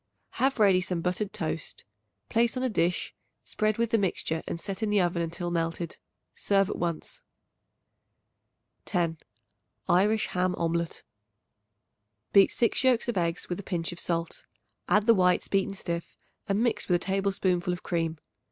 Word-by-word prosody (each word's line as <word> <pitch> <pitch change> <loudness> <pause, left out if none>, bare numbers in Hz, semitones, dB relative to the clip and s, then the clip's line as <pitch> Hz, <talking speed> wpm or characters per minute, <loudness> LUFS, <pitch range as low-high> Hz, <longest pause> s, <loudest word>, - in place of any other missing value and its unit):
Have 270 +1 +3
ready 195 -4 +5
some 180 -2 -2
buttered 180 +4 -1
toast; 160 -2 -5 0.4
place 235 +2 +1
on 255 - -1
a 260 - +1
dish, 175 -5 0 0.3
spread 215 0 0
with 235 0 0
the 225 - +3
mixture 165 -4 -1
and 170 - -3
set 195 +4 -5
in 220 - 0
the 210 -1 +3
oven 175 -1 +1
until 170 +1 -3
melted. 165 0 -2 0.4
Serve 195 0 +1
at - - -3
once. 170 -2 -4 1.6
10. 170 -4 -1 0.7
Irish 210 +5 +3
Ham 180 0 0
Omelet. 170 0 -1 1.3
Beat 195 -1 +7
6 235 +3 +1
yolks 250 -2 +3
of 235 - -1
eggs 170 -2 -1
with 175 - -3
a - - -3
pinch 175 -3 -2
of 175 - -8
salt; 165 -1 -2 0.4
add 210 0 +4
the 230 - +7
whites 180 -3 +3
beaten 195 0 0
stiff 170 -3 -5 0.3
and 200 +3 +2
mix 220 -4 0
with 180 - +3
a 175 - -1
tablespoonful 190 -2 0
of 180 - -5
cream. 165 -2 -1
180 Hz, 160 wpm, -28 LUFS, 170-210 Hz, 1.6 s, Beat